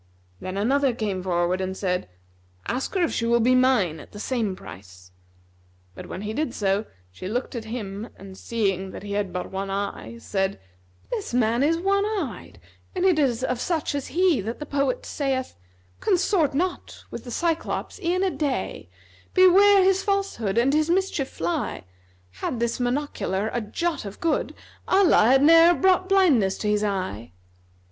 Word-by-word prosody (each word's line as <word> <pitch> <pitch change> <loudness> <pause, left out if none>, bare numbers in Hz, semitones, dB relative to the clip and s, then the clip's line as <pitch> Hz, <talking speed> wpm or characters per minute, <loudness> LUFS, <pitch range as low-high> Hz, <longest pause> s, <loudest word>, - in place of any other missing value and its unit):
Then 185 - -5
another 265 +4 +2
came 205 -5 -2
forward 180 0 0
and 190 0 -3
said, 180 - -2 0.6
"Ask 260 +9 -3
her 370 - +2
if 335 - 0
she 230 - -1
will 235 0 +3
be 245 +2 +4
mine 255 -11 +3
at - - -14
the 205 - -8
same 220 -5 -1
price;" 90 - -13 0.8
but, 85 - -10
when 190 - -6
he 215 +1 -3
did 290 0 -2
so, 200 +1 0 0.3
she 140 - -8
looked 240 +6 -3
at 235 -3 -5
him 220 -1 -5
and 195 -1 -11
seeing 195 -3 -1
that - - -9
he 205 - -7
had 200 -2 -1
but 180 0 -5
one 195 +1 -3
eye, 195 - -4
said, 195 - -2 0.5
"This 430 - -3
man 235 0 +2
is 320 +4 +3
one 395 +3 +1
eyed; 425 -1 -4 0.4
and 365 0 0
it 360 -5 +4
is 255 -4 +1
of 250 -2 -1
such 325 -5 -1
as 285 -2 -3
he 355 - +2
that 225 +4 -4
the 300 - -6
poet 285 - -1
saith,[FN#270] 95 - -5
'Consort 345 -5 +2
not 360 +5 -3
with - - -7
the 245 - -9
Cyclops 335 - -2
e'en 365 +1 +1
a 380 - +1
day; 285 -6 -3 0.2
* - - -29
Beware 390 +2 +7
his 385 0 +3
falsehood 390 - -1
and 255 +4 +3
his 310 +1 +2
mischief 350 -6 0
fly: 170 - -3 0.5
Had 95 - -4
this 235 +1 -1
monocular 245 -6 -1
a 240 - -1
jot 300 +7 -2
of 200 - -8
good, 330 - -1 0.2
* - - -28
Allah 380 - +5
had 265 +4 +5
ne'er 330 +3 +7
brought 370 0 +2
blindness 290 - +4
to 210 - -3
his 210 0 +1
eye!'" 185 - -3
240 Hz, 180 wpm, -24 LUFS, -, 0.8 s, Beware